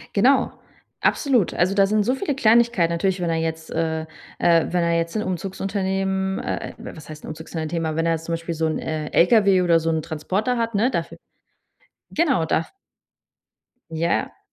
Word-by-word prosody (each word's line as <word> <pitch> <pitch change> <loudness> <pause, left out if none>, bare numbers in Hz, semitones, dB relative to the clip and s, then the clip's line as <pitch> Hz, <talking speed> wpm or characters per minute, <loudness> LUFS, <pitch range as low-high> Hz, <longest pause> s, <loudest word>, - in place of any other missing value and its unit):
Genau, 255 +6 +4 0.5
absolut. 255 - +2
Also, 180 +2 +2
da 195 -1 +4
sind 210 +1 +2
so 250 - +1
viele 285 0 -2
Kleinigkeiten 235 -7 +3
natürlich, 185 +2 0
wenn 170 -1 -1
er 165 - 0
jetzt, 160 0 -3
äh, 160 -1 -1 0.4
äh, 170 -1 +3
wenn 175 -1 +1
er 170 0 +1
jetzt 165 +2 -1
'n 215 - -1
Umzugsunternehmen, 190 +1 -2
äh - - -4
was 155 -1 -10
heißt 155 0 -9
'n - - -10
Umzugsunternehmen, 160 +1 -4
aber 155 0 -3
wenn 165 - +1
er 165 - +2
jetzt 160 0 -4
zum 170 - -3
Beispiel 165 0 -3
so 160 0 0
'n, 155 - -1
äh, 155 -1 -4
LKW 195 0 +4
oder 170 -2 +4
so 165 0 -1
'n 160 -2 0
Transporter 190 +10 -2
hat, 230 -1 -1
ne, 230 +6 +2
dafür. - - -3 0.9
Genau, 280 - +2
da 160 - 0 1.2
Ja. 165 +1 -1
175 Hz, 180 wpm, -22 LUFS, 165-205 Hz, 1.2 s, Genau